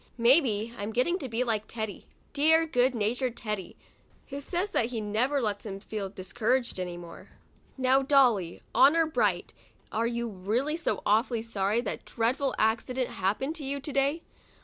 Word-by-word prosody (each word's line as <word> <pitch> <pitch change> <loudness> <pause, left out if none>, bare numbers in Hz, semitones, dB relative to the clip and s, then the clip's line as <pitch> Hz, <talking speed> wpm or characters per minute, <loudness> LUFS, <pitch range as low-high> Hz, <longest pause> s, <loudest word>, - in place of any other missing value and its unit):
Maybe 235 -3 +3
I'm 205 +2 -3
getting 340 - +1
to 270 - -5
be 230 +2 0
like 220 -3 -1
Teddy, 220 -3 -5 0.3
dear 320 +3 +4
good 255 -4 +2
natured 235 +3 -1
Teddy, 210 -5 -5 0.5
who 280 0 -5
says 360 +7 -2
that 230 - +2
he 240 -2 -4
never 225 +7 0
lets 210 -5 -2
himself 195 -2 -8
feel 205 -3 -3
discouraged 220 +5 -1
any 180 -1 -4
more. 170 -1 -11 0.5
Now, 260 +1 +3
Dolly, 250 - +3
honor 320 +5 +6
bright, 315 - 0 0.4
are 230 +1 0
you 235 0 -2
really 225 +9 -1
so 335 - -2
awfully 225 +2 +2
sorry 215 0 0
that - - -5
dreadful 255 +4 0
accident 235 +3 0
happened 210 +10 -1
to 300 - -7
you, 280 +1 -2
to 280 +1 -6
day? 280 +4 +1
235 Hz, 165 wpm, -28 LUFS, 215-275 Hz, 0.5 s, honor